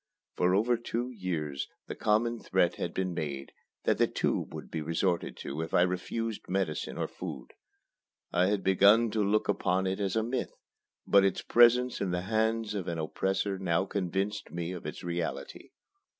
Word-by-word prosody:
For 90 +1 +3
over 115 +4 +3
two 120 +2 -3
years, 80 - -3 0.2
the - - -5
common 115 +2 +1
threat 90 -4 +1
had 85 - -2
been 95 -1 -2
made 70 -5 -4 0.3
that - - +2
the - - +5
"tube" - - -1
would - - -8
be 80 - -2
resorted 85 +3 -1
to 70 +4 -4
if 80 - -3
I 90 - +6
refused 105 +5 -3
medicine 95 -5 -1
or - - -1
food. - - -7 0.8
I 90 +1 +4
had 100 -1 0
begun 100 +4 +5
to 110 -1 +1
look 105 +2 +2
upon 95 -2 +1
it 95 +1 -1
as 100 -1 -1
a 110 - +2
myth; 120 +3 -2 0.5
but 100 -1 +5
its 95 -2 +1
presence 120 +1 +5
in 100 - 0
the 90 0 -1
hands 110 +2 0
of 95 -3 -3
an 85 - -2
oppressor 95 +4 -1
now 90 -1 +1
convinced 100 +2 -2
me 85 0 -4
of 90 -2 -6
its - - -7
reality. 85 -1 -4
95 Hz, 180 wpm, -30 LUFS, 90-110 Hz, 0.8 s, I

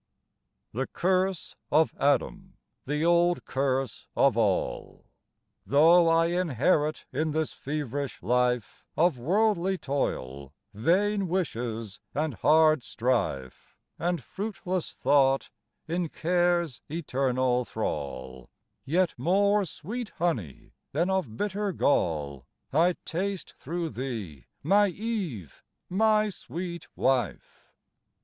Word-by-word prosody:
The 130 +4 -2
curse 185 0 0 0.2
of 155 +2 +4
Adam, 185 +7 0 0.3
the 150 +3 0
old 175 +1 +3
curse 135 -1 -1
of - - +4
all, - - -1 0.6
Though 165 +4 +5
I 165 0 +4
inherit 160 -2 +1
in 155 +3 -1
this 160 -1 -1
feverish 140 - -4
life 125 +1 0
Of 165 -5 +3
worldly 190 - +2
toil, 70 - -3 0.2
vain 190 - +1
wishes, 115 - -3 0.2
and 150 0 0
hard 155 +6 +4
strife, 115 - -2 0.2
And 175 -3 -1
fruitless 190 -3 -4
thought, 135 -1 +2 0.4
in 170 0 -1
Care's 175 -4 +1
eternal 130 -5 0
thrall, 65 - -5 0.3
Yet 175 +5 +1
more 200 +3 +3
sweet 215 +8 -6
honey 120 - -2 0.2
than 170 +6 +1
of 150 -13 -1
bitter 205 0 -1
gall 75 - 0 0.3
I 170 +4 +4
taste, 190 +1 -3
through 170 +3 -4
thee, 110 - -6 0.2
my 205 +7 +4
Eve, 185 - -4 0.3
my 215 +2 +3
sweet 170 0 -6
wife. 125 -7 -1
155 Hz, 100 wpm, -28 LUFS, 125-180 Hz, 0.6 s, Though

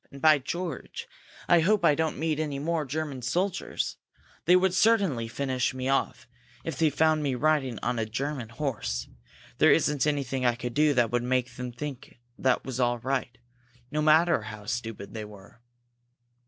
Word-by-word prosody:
"And, 140 - -10
by 155 +1 +5
George, 170 +5 -5 0.4
I 175 - +6
hope 205 +5 +3
I 150 - +6
don't 160 +1 -1
meet 155 0 -1
any 150 -3 -2
more 160 +2 -1
German 145 -1 -4
soldiers! 180 +9 -2 0.5
They 180 - +6
would 185 0 +3
certainly 185 - +3
finish 130 +1 -1
me 130 +1 -2
off 135 -3 -1 0.4
if 165 - -4
they 160 -1 +3
found 155 +1 +2
me 140 -3 0
riding 135 -3 +1
on 120 -1 0
a 110 - -1
German 130 +1 -3
horse! 115 - -3 0.5
There - - +6
isn't 150 0 +2
anything 135 -3 -1
I 120 -1 +3
could 120 0 -5
do 150 +1 +3
that 120 -2 +2
would 120 0 +1
make 125 0 0
them 125 0 -5
think 135 0 -7 0.2
that 130 -1 +1
was 130 -1 -4
all 120 -1 +2
right, 130 +1 -2 0.5
no 150 - 0
matter 160 -1 +4
how 105 -1 -9
stupid 115 -3 -5
they 110 -1 -5
were!" 105 +2 -14
135 Hz, 175 wpm, -27 LUFS, 120-155 Hz, 0.5 s, I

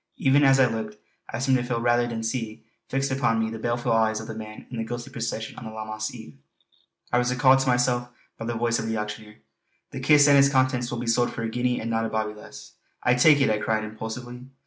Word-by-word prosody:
Even 140 +2 +3
as 135 -1 +5
I 135 - +6
looked, 110 -3 -4 0.3
I 115 - -4
seemed 130 +1 +2
to - - -2
feel 125 -1 -2
rather 120 0 +2
than 115 -1 -4
see 110 -1 -4 0.3
fixed 135 0 -1
upon 125 -4 +1
me 110 0 -1
the 115 - -6
baleful 120 +1 -1
eyes 110 -1 +2
of 110 - -7
the 110 - -6
man 110 -1 -9
in 120 - -5
the 115 - -2
ghostly 120 +1 -6
procession 110 0 -4
on 120 - -10
that 110 0 -8
Lammas 110 0 -4
eve. 75 - -12 0.7
I 125 - +4
was 125 0 0
recalled 130 +1 +5
to 135 - -1
myself 125 -1 +1 0.3
by 115 - -7
the 120 0 -3
voice 115 0 0
of 110 - -3
the 110 0 -1
auctioneer: 105 0 -6 0.6
"The - - -6
kist 150 -1 +5
and 140 -1 +6
its 140 0 +5
contents 130 -2 +1
will 120 - -4
be 120 - -4
sold 120 +1 +1
for 115 - -5
a 115 - -2
guinea 125 +1 -1
and 115 +1 -4
not 115 0 0
a - - -6
bawbee 110 -1 -2
less." 70 -10 -12 0.3
"I 125 - +4
take 145 +3 +5
it!" 135 - +3
I 105 - 0
cried 110 0 0
impulsively. 120 +3 -7
120 Hz, 250 wpm, -25 LUFS, 110-125 Hz, 0.7 s, I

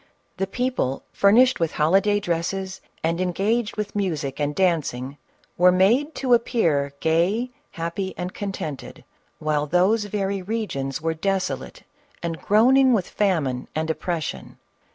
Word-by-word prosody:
The 195 +1 -1
people 245 - -1
furnished 235 +6 +4
with 165 -2 0
holiday 195 +7 +3
dresses, 190 +1 -3 0.2
and 165 +2 0
engaged 205 +6 0
with 210 -1 -4
music 155 -9 -2
and 145 0 -1
dancing, 145 -7 0 0.4
were 180 +1 +7
made 235 - +3
to 255 -2 +1
appear 165 - +2
gay, 180 +10 +1 0.2
happy, 170 +3 -4
and 180 +1 -4
con 200 -2 -4
tented, 150 -7 -7 0.3
while 150 -1 -1
those 190 +7 +2
very 200 -1 -2
regions 180 - -3
were 165 0 +1
desolate 195 +3 -2 0.4
and 165 -1 -3
groaning 255 +5 +5
with 195 -6 +1
famine 155 -11 0
and 160 +1 0
oppression. 160 +1 -4
185 Hz, 130 wpm, -23 LUFS, 160-210 Hz, 0.4 s, were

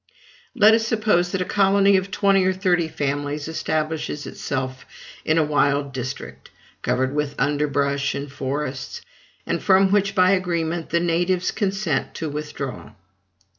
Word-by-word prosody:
Let 215 +1 +6
us 225 0 +2
suppose 210 -6 +1
that 190 -2 0
a - - -9
colony 200 0 +4
of 190 +1 0
twenty 195 0 +3
or 185 - +2
thirty 180 -3 +1
families 145 -1 -3
establishes 155 -2 -2
itself 130 -1 -4 0.4
in 155 - +1
a 160 - +4
wild 145 -2 +1
district, 130 0 -6 0.3
covered 130 +2 0
with 150 -1 -2
underbrush 140 -1 0
and 140 0 -5
forests; 135 0 -4 0.4
and - - -2
from 190 0 +4
which, 200 -1 +2
by 185 -1 +5
agreement, 170 -3 -1
the 170 - +2
natives 175 +2 +1
consent 195 -8 -1
to 160 - -3
withdraw. 145 -3 -6
160 Hz, 140 wpm, -22 LUFS, 145-190 Hz, 0.4 s, Let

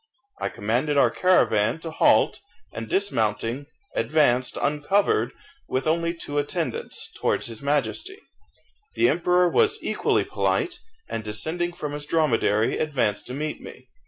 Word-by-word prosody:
I - - 0
commanded 125 +8 0
our - - +5
caravan 120 - +3
to 165 - -6
halt, - - +3 0.3
and 115 -1 -6
dismounting, 120 - 0 0.3
advanced 130 -5 +2
uncovered, 170 - +1 0.4
with 130 +1 -1
only 170 +2 +1
two 145 -3 -3
attendants, 145 - -3
towards - - +1
his 115 -2 -5
Majesty. 150 - -1 0.8
The 355 - +4
emperor 180 +1 +3
was 425 - +3
equally - - +1
polite, 360 -4 -1 0.3
and 115 - -4
descending 160 - -2
from 150 -4 -5
his 145 0 -6
dromedary, 115 -9 +2
advanced 130 -9 0
to 125 - -5
meet 150 +2 -4
me. - - -12
145 Hz, 130 wpm, -24 LUFS, 120-175 Hz, 0.8 s, our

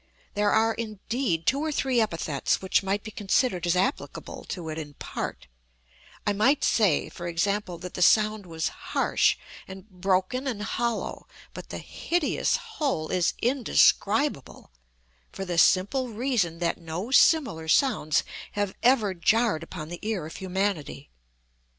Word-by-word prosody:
There 205 0 +2
are, 225 +1 +3
indeed, 215 -5 -2
two 275 - +2
or 310 +1 -1
three 260 -4 +1
epithets 165 - -1
which 190 - +1
might 195 +1 -2
be 215 - -7
considered 195 -3 0
as 175 - +2
applicable 190 +10 -2
to 170 -4 -6
it 155 +1 -4
in 145 -2 -8
part; - - -5 0.8
I 205 - +2
might 255 +8 +2
say, 200 -10 +2
for 175 - -7
example, 185 +2 -1
that 180 +1 -8
the - - -5
sound 215 +2 +4
was 160 -1 -2
harsh, - - +1 0.3
and 190 +1 -10
broken 190 +7 -1
and 215 -5 -3
hollow; 235 +1 -3 0.3
but - - -9
the - - -5
hideous 340 -3 -1
whole 285 - -2
is 180 -2 +1
indescribable, 235 - +2 0.6
for 195 - -6
the 175 -2 0
simple 200 +10 +3
reason 220 -7 -1
that 170 0 -1
no 170 +8 -5
similar 260 - +4
sounds 185 - +2 0.3
have 205 -2 -1
ever 235 -6 +3
jarred 210 0 +2
upon 165 -2 -7
the 175 0 -7
ear 210 -7 -2
of 160 - -8
humanity. 190 -6 -3
200 Hz, 145 wpm, -26 LUFS, 175-235 Hz, 0.8 s, sound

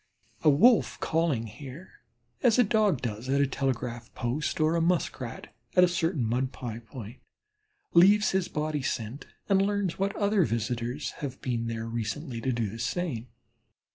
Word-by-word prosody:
A 155 - +5
Wolf 220 - +5
calling 160 -8 0
here, 130 - -11 0.4
as 240 -3 +4
a 250 - +7
Dog 210 - +2
does 115 +1 -4
at 140 +1 +2
a 140 - +4
telegraph 125 -3 -3
post, 130 +7 -2
or 155 +1 +3
a 170 - +2
Muskrat 165 -8 -1 0.2
at 180 - +7
a - - +7
certain 170 -6 0
mud 125 +3 0
pie 115 -3 -6
point, 120 0 -10 0.8
leaves 200 +5 +6
his 190 -2 +1
body 150 -1 -2
scent 125 +1 -4 0.2
and 195 -1 +4
learns 200 -3 0
what 195 +1 0
other 200 -2 +3
visitors 120 +2 -2
have 135 -3 -4
been 115 -3 -2
there 115 -1 -3
recently 115 +1 -4
to 130 - 0
do 115 -3 -1
the 110 +4 -7
same. 125 -1 -2
135 Hz, 165 wpm, -28 LUFS, 115-175 Hz, 0.8 s, a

